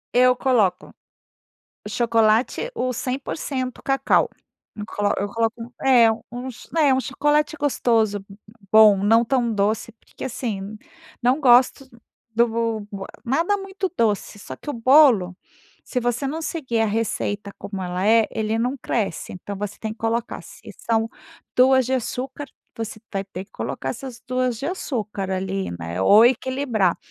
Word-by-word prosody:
Eu 250 0 +5
coloco, 240 -8 +1 0.9
o - - -3
chocolate 230 - +2
o 255 0 -1
100% 255 0 -4
cacau. 270 0 +2 0.5
Eu 210 - -5
colo 205 -1 0 0.2
coloco 230 0 -1
um 245 +3 -8
é 240 -3 +7 0.2
uns 245 0 -8
né, 305 -5 +3
um 260 - +2
chocolate 295 +3 0
gostoso, 225 -8 +1 0.5
bom, 215 -3 +7
não 225 +3 +4
tão 240 -1 +1
doce, 215 +3 0
porque 225 - -12
assim, 215 -5 -4 0.5
não 255 +5 +2
gosto 255 +1 +4 0.5
do 235 +1 +4
bo 225 -2 -2 0.4
e - - -4
nada 335 +9 +2
muito 390 -1 -4
doce, 210 -1 0
só - - -8
que - - -13
o 290 - -2
bolo, 235 -7 +5 0.5
se 250 - -3
você 245 +3 -1
não 320 +4 -3
seguir 260 -9 -2
a - - +2
receita 205 -1 -2
como 195 -2 -6
ela 180 +2 -2
é, 225 0 +5
ele 220 0 -1
não 250 +4 0
cresce, 225 -5 -3
então 195 +2 -7
você 205 0 -5
tem 220 -1 -4
que 220 - -15
colocar 230 +1 -2
se - - -14 0.2
são 225 -1 0 0.5
2 260 0 +5
de 260 - 0
açúcar, 260 +3 -4 0.3
você 220 -1 -6
vai 195 0 -2
ter 190 0 -8
que - - -36
colocar - - -5
essas 245 -1 -6
2 255 -2 -1
de 275 - -7
açúcar, 215 - -3
ali, 190 +1 -2
né, 85 +2 -4
ou 210 - +7
equilibrar. 245 -6 +1
230 Hz, 155 wpm, -22 LUFS, 215-260 Hz, 0.9 s, é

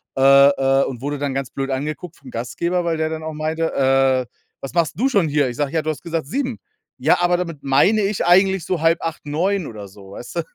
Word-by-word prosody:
äh 135 - -1 0.3
äh, 135 -1 +2
und 125 -3 -6
wurde 145 +1 -3
dann 140 -1 -2
ganz 135 -1 -3
blöd 135 0 -4
angeguckt 155 +5 -4
vom 135 - -14
Gastgeber, 170 +10 -2
weil 165 -1 0
der 155 0 -1
dann 160 0 -5
auch 160 0 -5
meinte: 160 +2 -2
„Äh, 135 -1 +2 0.4
was 135 - -7
machst 165 -3 +1
denn 225 - -3
du 275 - +3
schon 200 -10 +2
hier?“ 145 -3 +1
Ich 120 - -7
sage: 145 -2 -1
„Ja, 160 - +1
du 155 - -3
hast 155 - -4
gesagt 165 -4 -3
7:00” 255 - -3 0.4
„Ja, 145 +5 +3
aber 175 0 +3
damit 170 -5 -5
meine 140 +11 +3
ich 195 -3 -1
eigentlich 190 0 +4
so 185 -2 -1
7:30, 165 -1 0
9:00 175 +5 -1
oder 105 -3 -9
so”, 95 0 -15
weißt 120 +9 -10
du? 170 - +2
155 Hz, 240 wpm, -20 LUFS, 135-175 Hz, 0.4 s, eigentlich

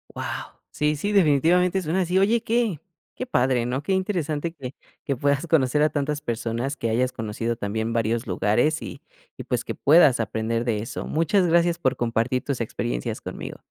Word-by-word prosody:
Guau. - - -5 0.2
Sí, 150 0 0
sí, 205 +8 -2
definitivamente 180 +1 +3
suena 175 +3 0
así, 180 +1 0
oye, 220 +4 +3
qué 230 - 0 0.4
qué 255 - -4
padre, 125 - +1
¿no? 125 +3 -2
qué 190 - -1
interesante 170 -5 -1
que 135 -4 -8 0.3
que 140 - -1
puedas 140 +5 0
conocer 150 -2 +2
a 155 - +4
tantas 145 0 -2
personas, 120 +4 -3
que 115 - -2
hayas 125 +3 +1
conocido 115 +1 -3
también 110 +1 -3
varios 115 +1 0
lugares, 120 +12 +1
y - - -8 0.4
y, - - -6
pues, - - -2
que - - -4
puedas 145 -4 +5
aprender 115 +2 -1
de 115 -3 0
eso. 115 - -5
Muchas 170 +4 +2
gracias 170 0 +3
por 130 - +1
compartir 120 +2 0
tus 135 -4 -3
experiencias - - -3
conmigo. - - -7
140 Hz, 180 wpm, -24 LUFS, 115-170 Hz, 0.4 s, puedas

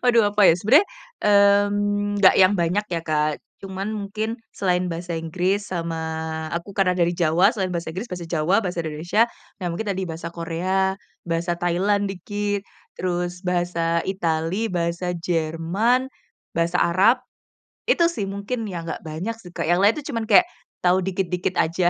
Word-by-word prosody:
Waduh 235 -4 +5
apa 205 0 +3
ya, - - +7
sebenarnya, 270 - +5 0.4
mmm, 205 0 +3
nggak 190 - +7
yang 185 +1 +6
banyak 180 +5 +1
ya, 165 - 0
Kak. 150 -1 0 0.2
Cuman 195 +1 -5
mungkin 215 +2 -3 0.2
selain 180 -2 0
bahasa 170 0 -4
Inggris 180 +5 -1
sama 165 -2 -2 0.6
aku 170 +4 -5
karena 190 -2 +3
dari 175 -1 +1
Jawa 170 +3 +4
selain 185 -2 -1
bahasa 170 -1 -3
Inggris, 185 +7 -5
bahasa 175 -2 -6
Jawa, 170 +5 +2
bahasa 175 -5 -3
Indonesia, 160 +8 +1 0.3
ya, 185 - -5
mungkin 210 +5 -4
tadi 190 -1 -1
bahasa 165 -1 -5
Korea, 180 +3 -1 0.3
bahasa 170 +1 -1
Thailand 185 +4 +1
dikit, 205 +2 -3 0.4
terus 180 0 -2
bahasa 175 -2 0
Itali, 180 +3 -1
bahasa 175 0 -2
Jerman, 170 +10 0 0.4
bahasa 170 +1 +1
Arab, 195 +8 +3 0.6
itu 340 - +4
sih, 205 -12 -3
mungkin, 200 +4 -4
ya, 175 -4 -5
nggak 165 - -5
banyak 170 +9 -4
sih 180 -5 -12
Kak, - - -2
yang 175 +2 +3
lain 205 +3 +5
itu 300 -1 -6
cuman 230 -3 -3
kayak 225 - +7 0.4
tahu 180 +1 +4
dikit-dikit 180 -1 -2
aja, 175 +2 +2
180 Hz, 160 wpm, -23 LUFS, 170-205 Hz, 0.6 s, ya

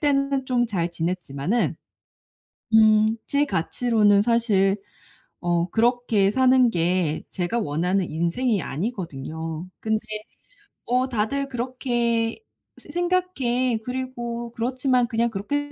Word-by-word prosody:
때는 275 -2 +1
좀 245 -2 +2
잘 175 -6 -1
지냈지만은 170 - -1 1.0
음 215 0 +5
제 285 +1 +2
가치로는 210 - +2
사실 210 -4 +2 0.6
어 175 0 0
그렇게 230 -2 +2
사는 255 0 +4
게 170 -3 0
제가 185 +6 -1
원하는 180 +1 0
인생이 180 +8 0
아니거든요. 160 - -5
근데 220 0 0 0.9
어 250 +2 +1
"다들 255 +5 -1
그렇게 240 - -1 0.4
새 - - -15
생각 360 +2 0
해. 245 -1 +1
그리고 240 -2 -4
그렇지만 250 +1 +1
그냥 235 +1 +1
그렇게 290 +9 -3
230 Hz, 235 characters per minute, -24 LUFS, 185-255 Hz, 1.0 s, 음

